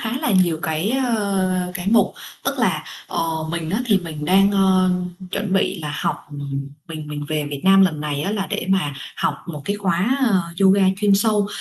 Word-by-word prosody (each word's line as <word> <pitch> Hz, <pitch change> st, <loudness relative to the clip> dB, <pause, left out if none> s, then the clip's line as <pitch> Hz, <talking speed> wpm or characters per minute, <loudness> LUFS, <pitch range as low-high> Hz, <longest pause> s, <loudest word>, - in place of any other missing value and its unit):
khá 230 Hz, +3 st, -2 dB
là 240 Hz, -, -1 dB
nhiều 165 Hz, -3 st, 0 dB
cái 160 Hz, +6 st, -1 dB
ờ, 200 Hz, -8 st, 0 dB
cái 180 Hz, -1 st, -5 dB
mục, 230 Hz, -, +4 dB, 0.3 s
tức -, -, -1 dB
là, -, -, +1 dB, 0.2 s
ờ, 160 Hz, -1 st, -2 dB
mình 165 Hz, -1 st, -3 dB
á 210 Hz, +6 st, 0 dB
thì 210 Hz, -4 st, +4 dB
mình 160 Hz, -4 st, -6 dB
đang, 195 Hz, +4 st, +4 dB
ờ, 190 Hz, -2 st, +3 dB, 0.4 s
chuẩn 200 Hz, 0 st, -2 dB
bị 195 Hz, -1 st, +1 dB
là 150 Hz, -1 st, -4 dB
học, -, -, 0 dB
ừm, 140 Hz, -1 st, -5 dB, 0.2 s
mình 155 Hz, -2 st, -7 dB
mình 145 Hz, 0 st, -5 dB
về 155 Hz, -1 st, -1 dB
Việt 140 Hz, -1 st, -4 dB
Nam 195 Hz, 0 st, +6 dB
lần 160 Hz, -6 st, +1 dB
này 145 Hz, -1 st, -2 dB
á 195 Hz, -, -1 dB
là 205 Hz, -2 st, -2 dB
để -, -, -2 dB
mà 180 Hz, -7 st, +1 dB, 0.2 s
học 190 Hz, -1 st, 0 dB
một 150 Hz, -5 st, -6 dB
cái 200 Hz, +7 st, -1 dB
khóa, 195 Hz, +5 st, +1 dB
à, 220 Hz, -8 st, +3 dB, 0.2 s
yoga 195 Hz, +1 st, +5 dB
chuyên 205 Hz, 0 st, +3 dB
sâu. 210 Hz, 0 st, +2 dB
185 Hz, 205 wpm, -21 LUFS, 155-200 Hz, 0.4 s, Nam